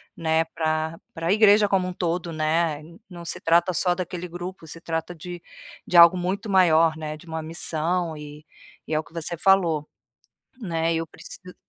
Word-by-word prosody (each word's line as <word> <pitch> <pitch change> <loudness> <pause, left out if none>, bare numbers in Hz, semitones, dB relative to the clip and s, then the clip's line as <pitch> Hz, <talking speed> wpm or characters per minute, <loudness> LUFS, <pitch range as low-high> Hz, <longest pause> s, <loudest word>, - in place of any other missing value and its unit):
né, 160 0 +1
pra 160 0 -2 0.2
pra 165 +2 -2
igreja 210 -1 +5
como 190 -2 +1
um 180 - -4
todo, 175 -1 -2
né. 155 0 0 0.3
Não 170 -1 -10
se - - -3
trata 170 +2 +3
só 180 +1 +2
daquele 180 0 -5
grupo, 175 -1 -8
se 165 - -8
trata 165 +1 -4
de 175 +2 -8 0.5
de 175 - +2
algo 170 +2 +9
muito 190 +5 -3
maior, 165 -4 +4
né, 155 -1 -6
de 165 - -17
uma 160 -1 -5
missão 165 +1 -2
e 150 0 -10 0.4
e 155 - -3
é 155 - +2
o - - -4
que - - -21
você 170 +1 -3
falou, 170 -6 +3 0.7
né, 165 -4 -1
eu 165 0 -2
preciso 180 +3 -11
165 Hz, 180 wpm, -24 LUFS, 160-180 Hz, 0.7 s, algo